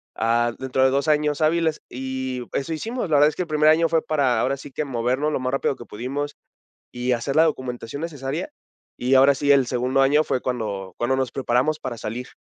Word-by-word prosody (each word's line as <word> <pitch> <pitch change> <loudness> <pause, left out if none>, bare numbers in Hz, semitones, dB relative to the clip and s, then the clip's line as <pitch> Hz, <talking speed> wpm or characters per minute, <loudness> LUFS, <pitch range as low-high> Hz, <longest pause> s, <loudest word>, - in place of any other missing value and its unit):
ah, 120 +1 +1
dentro 130 0 0
de 130 - +4
2 140 +3 0
años 150 0 +1
hábiles, 160 0 +1
y 130 -1 -4
eso 140 +4 -2
hicimos. 225 +3 -3
La 150 - +3
verdad 150 +1 +6
es 150 - -8
que - - -1
el - - -10
primer 155 0 +4
año 165 +1 +4
fue 165 -1 +2
para 135 -7 +1
ahora 135 +1 0
sí 140 0 -11
que 150 - -3
movernos 130 +4 -1
lo - - 0
más 130 0 -2
rápido 135 0 0
que 120 - -10
pudimos 140 +6 -4 0.6
y 125 +1 -1
hacer 125 +4 -1
la 160 - +7
documentación 130 -1 -3
necesaria, 155 - -4 0.5
y 125 +2 +2
ahora 135 +1 +6
sí, 145 +1 +3
el 135 -3 +4
segundo 130 +2 +1
año 145 +3 +4
fue 125 - -1
cuando 100 -7 -4
cuando 130 +3 +1
nos 130 -2 -1
preparamos 130 +4 0
para 125 -3 -5
salir. 125 +4 -5
135 Hz, 215 wpm, -23 LUFS, 125-150 Hz, 0.6 s, la